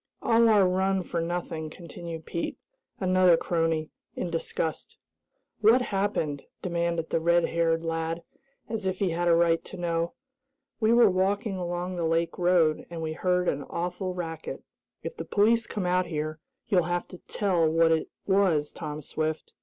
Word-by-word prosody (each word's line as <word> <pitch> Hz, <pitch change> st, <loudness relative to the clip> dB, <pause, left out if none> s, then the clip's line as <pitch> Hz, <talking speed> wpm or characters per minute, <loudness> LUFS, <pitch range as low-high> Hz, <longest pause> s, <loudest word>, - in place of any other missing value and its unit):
"All 230 Hz, 0 st, +5 dB
our 205 Hz, -4 st, +5 dB
run 190 Hz, +1 st, +1 dB
for 170 Hz, -1 st, -2 dB
nothing," 165 Hz, -2 st, -3 dB
continued 165 Hz, 0 st, -8 dB
Pete, 170 Hz, -, -3 dB, 0.4 s
another 185 Hz, -2 st, +5 dB
crony, 165 Hz, -2 st, 0 dB, 0.2 s
in 175 Hz, -, -3 dB
disgust. 165 Hz, -1 st, -3 dB, 0.6 s
"What 230 Hz, +4 st, +5 dB
happened?" 195 Hz, -, -1 dB, 0.2 s
demanded 170 Hz, -2 st, -1 dB
the -, -, +2 dB
red 170 Hz, +1 st, +3 dB
haired 165 Hz, 0 st, +1 dB
lad, 165 Hz, +1 st, -2 dB, 0.4 s
as 220 Hz, -4 st, -3 dB
if 185 Hz, 0 st, -1 dB
he 190 Hz, -3 st, 0 dB
had 175 Hz, +1 st, 0 dB
a 170 Hz, -, +6 dB
right 165 Hz, -1 st, +3 dB
to 190 Hz, -, -10 dB
know. 170 Hz, -1 st, -1 dB, 0.7 s
"We 220 Hz, -1 st, +3 dB
were 235 Hz, -1 st, +7 dB
walking 195 Hz, +3 st, 0 dB
along 175 Hz, 0 st, -3 dB
the 170 Hz, -, -1 dB
lake 165 Hz, +2 st, 0 dB
road, 175 Hz, -3 st, +3 dB
and 165 Hz, -1 st, -5 dB
we 155 Hz, 0 st, -2 dB
heard 180 Hz, +1 st, +1 dB
an 140 Hz, -, 0 dB
awful 180 Hz, +2 st, -3 dB
racket. 165 Hz, -3 st, -5 dB, 0.4 s
If 480 Hz, -, -5 dB
the -, -, -5 dB
police 225 Hz, +3 st, +2 dB
come 205 Hz, -4 st, -3 dB
out 180 Hz, 0 st, +2 dB
here, 155 Hz, -1 st, -3 dB, 0.3 s
you'll 185 Hz, -7 st, +3 dB
have 175 Hz, 0 st, -1 dB
to 180 Hz, -, -10 dB
tell 180 Hz, -6 st, +1 dB
what 165 Hz, +1 st, +4 dB
it 160 Hz, -1 st, +1 dB, 0.2 s
was, 185 Hz, -7 st, +2 dB
Tom 150 Hz, -2 st, -6 dB
Swift." 155 Hz, +2 st, -3 dB
175 Hz, 165 wpm, -27 LUFS, 165-185 Hz, 0.7 s, were